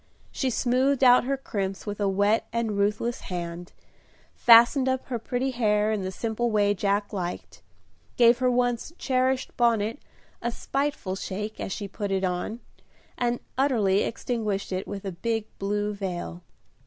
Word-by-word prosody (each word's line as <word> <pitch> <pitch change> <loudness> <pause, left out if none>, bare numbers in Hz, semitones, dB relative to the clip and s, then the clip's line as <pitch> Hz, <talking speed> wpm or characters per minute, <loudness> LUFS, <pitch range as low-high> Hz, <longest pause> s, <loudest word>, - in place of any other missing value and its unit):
She 265 - -1
smoothed 260 +3 +1
out 250 -1 +7
her 275 +1 0
crimps 195 -7 -4
with 205 -1 -5
a 200 -1 +1
wet 205 +3 +2
and 230 -3 -1
ruthless 210 +4 0
hand; 175 -1 -6 0.6
fastened 240 +3 +6
up 260 0 -1
her 240 -3 -2
pretty 250 +4 -2
hair 215 -3 +2
in 215 -2 -1
the 185 0 -3
simple 230 +4 -2
way 205 -2 +3
Jack 200 +1 -1
liked; 180 -3 -5 0.6
gave 240 0 +6
her 255 -1 +3
once 245 +4 0
cherished 260 0 0
bonnet 230 0 +2 0.4
a 235 - -1
spiteful 275 -7 -2
shake, 210 +2 -5
as - - -4
she 200 +1 -4
put 200 +1 -4
it 195 0 0
on, 185 +6 -2 0.5
and 240 0 -1 0.2
utterly 215 -8 +3
extinguished 215 -5 -2
it 185 0 -3
with 200 -1 -6
a 195 - -2
big 225 +5 -2
blue 205 +1 -1
veil. 180 -3 -5
215 Hz, 155 wpm, -26 LUFS, 200-245 Hz, 0.6 s, out